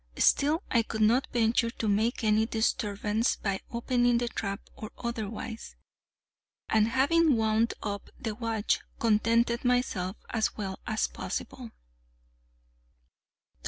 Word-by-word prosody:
Still 310 +6 +3
I 235 - +4
could 220 -1 -2
not 240 +5 +3
venture 230 0 +2
to 230 -1 -4
make 220 +4 +1
any 215 0 +3
disturbance 220 -1 0
by 195 -2 -2
opening 240 0 +2
the 240 0 -1
trap 200 -2 -3 0.2
or 215 - -7
otherwise, 225 -1 -5 0.9
and, 220 0 +3
having 285 +5 +3
wound 220 +1 +1
up 205 -2 -4
the 220 -2 -3
watch, 225 -1 0 0.2
contented 230 +2 +2
myself 245 -7 0 0.2
as 220 -2 0
well 195 -3 -4
as 220 -2 +1
possible. - - -6
225 Hz, 120 wpm, -29 LUFS, 215-240 Hz, 0.9 s, I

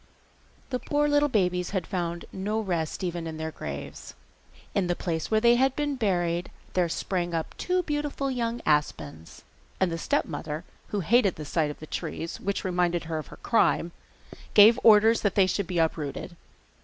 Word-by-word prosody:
The 250 - -1
poor 295 +2 +1
little 290 0 +3
babies 180 -6 +1
had 180 - -2
found 170 -1 -3
no 205 +3 -2
rest 175 -5 -2
even 175 -2 -3
in 160 -1 -6
their 160 0 -4
graves. 70 - -7 0.6
In 195 -3 +1
the 175 - 0
place 165 -3 -3
where 220 - +3
they 235 +1 +5
had 265 +1 +2
been 290 -1 -1
buried 175 -6 0 0.2
there 180 -2 +2
sprang 175 0 -2
up 160 - -3
two 365 0 0
beautiful 295 -3 -2
young 235 -1 -2
aspens, 80 - -1 0.4
and 190 -2 +2
the 165 - -3
stepmother, 155 0 -2 0.2
who 205 - -2
hated 205 +1 +3
the 155 - -7
sight 155 +1 0
of 150 - -7
the 155 - -9
trees, 165 +1 -5
which 200 0 -2
reminded 175 -2 0
her 160 -1 -3
of 155 - -8
her - - -12
crime, 175 -6 +2 0.6
gave 215 +2 +8
orders 220 +1 +6
that 205 -3 0
they 195 - +5
should 185 0 -1
be 180 - -3
uprooted. 160 +1 -1
180 Hz, 180 wpm, -27 LUFS, 165-225 Hz, 0.6 s, gave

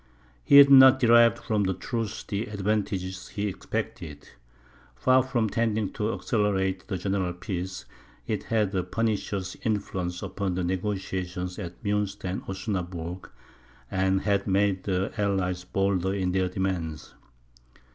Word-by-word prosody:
He 140 - +6
had 140 0 +9
not 130 -1 +9
derived 120 -2 +6
from 105 -2 -1
the 95 -1 0
truce 115 0 -4
the 100 +3 -3
advantages 100 -3 -2
he 105 - -4
expected. 95 -6 -5 0.7
Far 130 - +4
from 125 -4 0
tending 110 -2 -1
to 105 +1 -1
accelerate 100 -5 0
a 95 - -1
general 95 -1 -1
peace, 90 0 -5 0.4
it - - -3
had 110 -3 0
a 95 - +1
pernicious 100 -1 -2
influence 95 -6 -2
upon 100 -3 -3
the 90 - -1
negociations 90 -1 -3
at 90 +2 -8
Munster 100 -2 -1
and 95 - -3
Osnaburg, 90 -3 -4 0.6
and 95 0 +1
had 100 -1 0
made 95 -1 +1
the 95 -1 -1
allies 90 -3 -1
bolder 95 0 0
in 95 -2 0
their 95 0 +1
demands. 90 -5 -3
95 Hz, 135 wpm, -27 LUFS, 90-105 Hz, 0.7 s, had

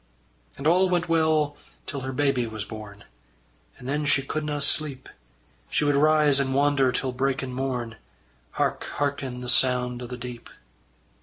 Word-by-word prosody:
And 140 - -8
all 180 +4 +4
went 175 -1 0
well 160 -3 +2 0.3
till 140 - -4
her 130 0 -5
baby 130 -3 0
was 110 -2 -5
born, 105 -2 -10 0.7
And 125 - -10
then 145 +2 -1
she 140 -2 +4
couldna 150 +1 -3
sleep; 145 -3 +2 0.6
She - - +1
would 145 - +3
rise 150 -1 +4
and 130 -1 0
wander 140 -2 +3
till 130 0 -1
breakin' 130 0 -2
morn, 125 -3 -3 0.6
Hark - - -1
harkin' 140 -3 -2
the 125 - -6
sound 125 -1 +2
o' 125 - -6
the 125 0 -7
deep. 120 -1 -8
135 Hz, 155 wpm, -25 LUFS, 125-145 Hz, 0.7 s, all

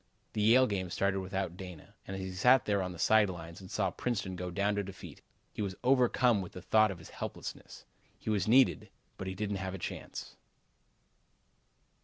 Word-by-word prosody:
The 105 - -1
Yale 120 +5 +6
game 95 -5 -2
started 95 +2 0
without 95 -2 -3
Dana, 90 -5 -10
and 95 - -4
as 95 - -4
he 95 - -4
sat 125 +7 +5
there 100 -2 +1
on 90 -1 -3
the 90 - -9
side 110 +2 +4
lines 85 0 -8
and 95 - -11
saw - - 0
Princeton 100 -6 -2
go 90 0 -4
down 100 +4 +1
to 100 0 -1
defeat, 95 0 -10 0.3
he - - -4
was 95 -2 -2
overcome 125 -3 +4
with 90 - -8
the 90 - -8
thought 110 0 +4
of 95 - -5
his 80 - -12
helplessness. - - -7 0.3
He - - -3
was 100 -3 +1
needed, 130 +4 +4 0.3
but 95 - -4
he 95 - -4
didn't 105 0 -2
have 95 0 -4
a - - -5
chance. 85 - -6
95 Hz, 200 wpm, -32 LUFS, 95-110 Hz, 0.3 s, Yale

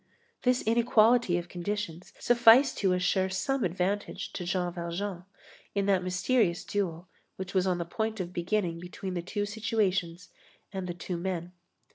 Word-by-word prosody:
This 250 0 +2
inequality 230 -3 +4
of 175 0 -4
conditions 180 -1 -4
sufficed 240 +2 +6
to 190 -2 +3
assure 185 +1 +1
some 255 +7 -1
advantage 185 +3 -2
to 180 - -4
Jean 180 -1 -1
Valjean 175 +2 -4 0.5
in 200 -1 +1
that 195 -2 +2
mysterious 185 +1 +1
duel 180 -4 -2 0.3
which 190 0 -6
was 190 -1 +2
on 180 -1 +1
the 170 - -3
point 220 +5 -3
of 180 -1 -4
beginning 175 -1 -1
between 180 +2 -6
the 175 - -2
two 205 +4 -2
situations 190 -5 -1 0.4
and 190 -1 -4
the 175 - -4
two 175 0 -4
men. 175 -1 -3
185 Hz, 155 wpm, -29 LUFS, 175-210 Hz, 0.5 s, sufficed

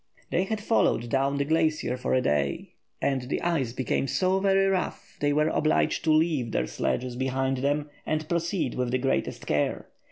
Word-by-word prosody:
They 185 - +2
had 220 +2 -2
followed 120 - +2
down 135 +2 +1
the 140 - 0
glacier 155 -4 +1
for 125 - -1
a 130 - +3
day, 70 - -1 0.3
and 135 -2 +1
the - - 0
ice 160 -9 0
became 130 +2 -1
so 185 +6 +1
very 195 0 +3
rough 190 -1 -2
they 145 0 +2
were 150 +2 +2
obliged 155 -1 +1
to 160 - +4
leave 155 -7 +2
their - - +1
sledges 125 - -2
behind 130 +1 0
them 145 +3 0 0.2
and 155 0 -2
proceed 170 -4 -1
with 125 -1 -1
the 130 - +1
greatest 135 +1 -1
care. 75 -1 -1
140 Hz, 185 wpm, -27 LUFS, 130-165 Hz, 0.3 s, to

